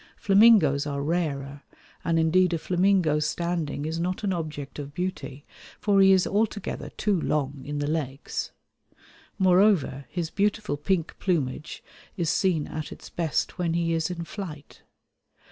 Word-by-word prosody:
Flamingoes 195 -9 +5
are 140 -1 -2
rarer; 145 -4 -2 0.4
and 165 0 +1
indeed 175 +2 +3
a - - 0
flamingo 180 -3 +2
standing 155 -1 -2
is 160 +1 -3
not 180 +4 -2
an 195 -2 +1
object 155 -4 -5
of 145 0 -7
beauty, 175 -6 -4 0.3
for 200 -2 +3
he 195 0 +7
is 190 -1 +4
altogether 205 -1 -2
too 200 -5 +1
long 140 -3 -1
in 145 +1 -4
the 145 - -1
legs. 145 -2 -3 0.9
Moreover 185 -7 +3
his 170 -3 -3
beautiful 210 -2 0
pink 165 +3 -1
plumage 155 -4 -2 0.3
is 170 -4 +1
seen 170 -5 +1
at 155 -1 -6
its - - -11
best 165 0 -2
when 170 -2 0
he 170 -1 +1
is 165 +1 0
in 175 -1 -4
flight. 165 -5 -8
165 Hz, 145 wpm, -26 LUFS, 150-185 Hz, 0.9 s, he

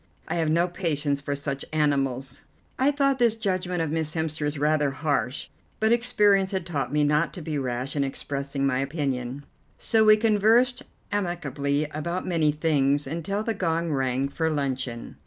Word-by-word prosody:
I - - -2
have 160 -2 +1
no 170 +3 +3
patience 150 -6 -2
with 140 0 -1
such 140 -1 -4
animals." 135 -4 0 0.4
I 265 +2 +4
thought 275 -2 +1
this 235 -2 +4
judgment 185 -5 -1
of 155 - -3
Miss 160 -1 -2
Hemster's 155 -2 -2
rather 150 0 +2
harsh, 140 -2 -1 0.3
but 220 +1 +2
experience 210 -5 +3
had 190 -3 -3
taught 140 -7 -2
me 150 0 +2
not 150 +3 +2
to 180 - -6
be 150 -2 -2
rash 130 +1 -3
in 140 - +1
expressing 140 0 -3
my 130 -2 +1
opinion; 135 -2 -3 0.3
so 220 -1 +3
we 215 0 +7
conversed 225 +3 +3 0.3
amicably 150 -7 -1
about 170 +5 -3
many 165 -4 +2
things 145 -2 +1
until 170 +8 -3
the 225 - -1
gong 165 -4 -1
rang 135 -1 0
for 160 +3 -1
luncheon. 130 -5 -3
155 Hz, 165 wpm, -26 LUFS, 140-185 Hz, 0.4 s, we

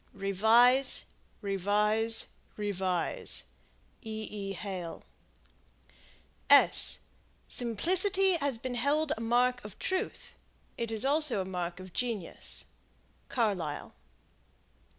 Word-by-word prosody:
Revise. 225 +7 +3 0.4
Revise. 210 +3 +1 0.3
Revise. 190 -4 -2 0.6
E. 220 -2 -5
E. 200 -2 -5
Hale. 185 -3 -6 2.4
Simplicity 375 - +3
has 285 -5 -1
been 250 +2 -5
held 285 +5 +1
a 225 - -8
mark 245 +2 +1
of 210 -1 -10
truth: 375 0 -3 0.4
it 230 -1 -3
is 225 +2 0
also 285 -8 +4
it - - -10
mark 180 -1 -4
of 185 -1 -11
genius. 230 -8 -3 0.6
Carlyle. 195 - -2
220 Hz, 90 wpm, -30 LUFS, 195-250 Hz, 2.4 s, also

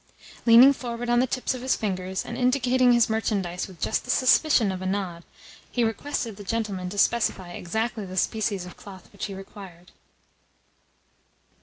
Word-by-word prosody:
Leaning 240 +4 +8
forward 240 -2 -4
on 240 - +4
the 255 - +2
tips 255 +1 -2
of 255 - -7
his 260 +1 +1
fingers, 190 -2 -3
and 240 - -6
indicating 250 0 +3
his 235 -2 +4
merchandise 200 -5 -2
with 185 -4 -14
just - - -1
the - - -14
suspicion 255 -4 +4
of 185 -1 -5
a - - -5
nod, 185 -3 -3 0.5
he 240 - 0
requested 225 -1 -3
the 205 - -9
gentleman 200 -4 -3
to 205 - -8
specify 195 -4 +1
exactly 220 +5 -3
the 185 -1 -8
species 205 -3 -1
of 180 - -11
cloth 195 -2 -13
which 200 - -5
he 200 - -6
required. 190 -2 -12
215 Hz, 170 wpm, -25 LUFS, 190-240 Hz, 0.5 s, Leaning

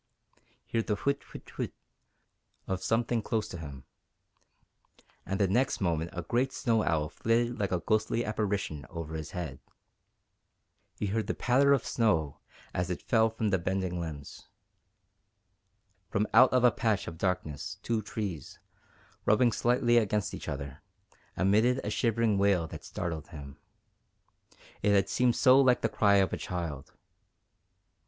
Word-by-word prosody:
He 115 - -1
heard 115 - -2
the 105 - +1
whit, 140 +6 -1
whit, - - -12
whit, - - -3 0.9
of 95 -1 -2
something 115 +3 0
close 110 0 -1
to 85 - -7
him, 70 -5 -8 1.4
and 95 +2 -2
the 100 - +3
next 120 +8 +1
moment 85 -3 0
a 90 -2 -5
great 125 +6 0
snow 115 -6 +1
owl 75 -2 +1
flitted 115 +7 0
like 100 -2 -1
a 90 - +2
ghostly 110 +4 0
apparition 100 -9 -2
over 85 -2 -6
his 80 -1 -5
head; 80 -8 -5 1.4
he - - -2
heard 110 +2 -1
the - - -1
patter 135 +3 +3
of 140 - +3
snow 80 - +1 0.3
as 90 +1 -1
it 90 - -4
fell 115 -2 +3
from 110 -1 -2
the 95 - +2
bending 90 0 -2
limbs; 75 -4 -7 1.6
from 105 - +1
out 130 - +7
of 130 -1 +3
a 125 - +7
patch 110 -4 0
of 80 - -7
darkness 90 +1 -2
two 115 -2 0
trees, 100 -8 -5 0.7
rubbing 120 +3 +4
slightly 120 +1 +2
against 105 -2 +1
each - - -7
other, 70 0 -6 0.6
emitted 110 +7 +3
a 105 - -3
shivering 115 -2 +1
wail 100 -4 +3
that 80 - -9
startled 80 -3 -5
him 70 -4 -10 1.2
it 105 0 +3
had 100 -1 +3
seemed 125 -1 +2
so 130 0 +6
like 125 -2 +4
the - - +2
cry 100 -2 +3
of 95 -1 +3
a - - -1
child. 80 -6 -5
100 Hz, 150 wpm, -29 LUFS, 85-115 Hz, 1.6 s, out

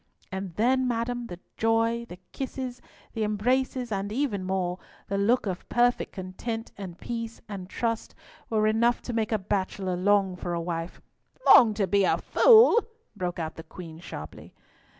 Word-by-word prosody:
And 190 -2 -5
then, 255 +4 +2
madam, 240 0 -2
the 175 -4 -8 0.2
joy, 225 +1 +1
the 175 - -9
kisses, 260 -2 -5 0.3
the 225 - -1
embraces, 245 +4 0
and 200 0 -2
even 225 -6 -1
more—the 185 +1 -3
look 230 +5 +2
of 185 -3 -4
perfect 245 0 +2
content, 220 +5 -5
and 185 -4 -8
peace, 230 +1 -5
and 195 -3 -7
trust, 230 0 -2 0.3
were 215 -1 +2
enough 230 +3 +2
to 245 - -5
make 225 -1 -1
a 220 - +3
bachelor 190 -1 -2
long 195 0 +2
for 175 -1 -4
a - - -1
wife." 165 0 -4 0.4
"Long 220 -4 +8
to 205 -2 +1
be 200 +2 +2
a - - +3
fool!" 465 0 +6 0.3
broke 175 -1 -3
out 160 -2 -3
the - - -6
Queen 165 -3 -10
sharply. 75 - -9
210 Hz, 160 wpm, -27 LUFS, 185-235 Hz, 0.4 s, Long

